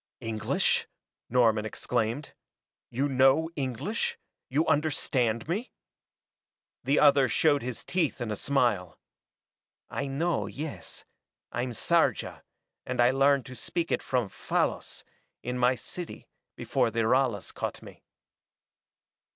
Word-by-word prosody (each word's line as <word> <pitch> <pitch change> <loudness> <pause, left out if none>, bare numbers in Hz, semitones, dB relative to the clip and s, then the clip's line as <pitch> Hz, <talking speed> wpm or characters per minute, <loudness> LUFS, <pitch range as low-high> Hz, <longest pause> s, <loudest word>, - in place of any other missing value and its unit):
"English?" 110 -3 0 0.4
Norman 115 -3 +3
exclaimed. 120 +4 -2 0.6
"You 135 +4 0
know 135 +4 +4
English 140 - -2 0.3
you 145 +5 +2
understand 135 -7 +1
me?" 205 +10 -3 1.1
The 140 +2 +2
other 140 -3 +6
showed 145 +3 +3
his 125 -1 -5
teeth 170 -6 0
in 120 -3 -3
a - - -1
smile. 120 - 0 0.9
"I 140 - -2
know, 160 +6 0
yes. 150 +1 -7 0.5
I'm 125 +2 -2
Sarja, 115 - +1 0.4
and 130 0 -4
I 120 +1 +6
learned 135 -1 +3
to 130 - -9
speak 165 +7 -2
it - - +1
from 125 -4 0
Fallas, - - -2 0.4
in 125 0 -3
my 125 +1 +4
city, 175 +7 -8 0.3
before - - +1
the 115 +1 -1
Ralas 120 -6 +1
caught - - -4
me." - - -13
130 Hz, 120 wpm, -28 LUFS, 120-145 Hz, 1.1 s, other